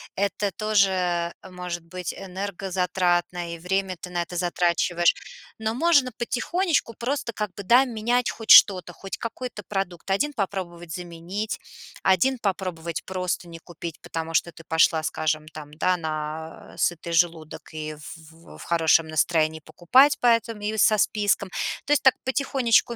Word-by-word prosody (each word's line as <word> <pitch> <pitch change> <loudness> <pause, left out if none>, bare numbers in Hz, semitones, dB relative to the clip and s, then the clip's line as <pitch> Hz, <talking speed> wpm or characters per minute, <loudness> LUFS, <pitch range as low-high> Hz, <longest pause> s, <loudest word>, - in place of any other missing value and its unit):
это 200 +1 -1
тоже, 210 0 +2
э, 175 -2 0 0.2
может 180 -2 -5
быть 180 +1 -5
энергозатратно, 180 -2 -2
и 170 - -8
время 190 +1 -1
ты 180 - -7
на 175 -1 -1
это 175 +1 -10
затрачиваешь. 175 0 +2 0.5
Но 220 +1 -2
можно 285 -3 +3
потихонечку 295 - 0
просто 245 -1 -3
как 210 -3 -4
бы, 200 - -7
да, 245 +7 +5
менять 240 +1 0
хоть 225 - -10
что-то, 185 -3 +7
хоть 195 -6 -7
какой-то 230 -1 -5
продукт. 195 -3 -4
Один 290 +10 +1
попробовать 175 -5 -4
заменить, 175 +5 -5 0.4
один 240 +8 +3
попробовать 180 -5 -3
просто 180 -1 -3
не 165 -1 -10
купить, 170 -1 -8
потому 165 0 -5
что 170 - +1
ты 165 - -14
пошла, 160 0 +3
скажем, 155 0 -1
там, 150 -2 -10
да, 180 +3 +1
на 155 0 -6
сытый 170 0 -1
желудок 165 -2 -1
и 155 0 -4
в 160 +2 -13
в - - -12
хорошем 165 -1 +3
настроении 155 0 +1
покупать 260 - +4
поэтому 230 -3 +2
и 215 +1 -1
со 215 0 +5
списком. 205 -2 +1 0.4
То 285 - -3
есть - - +3
так 265 -1 +5
потихонечку 260 -3 +2
180 Hz, 150 wpm, -25 LUFS, 170-215 Hz, 0.5 s, что-то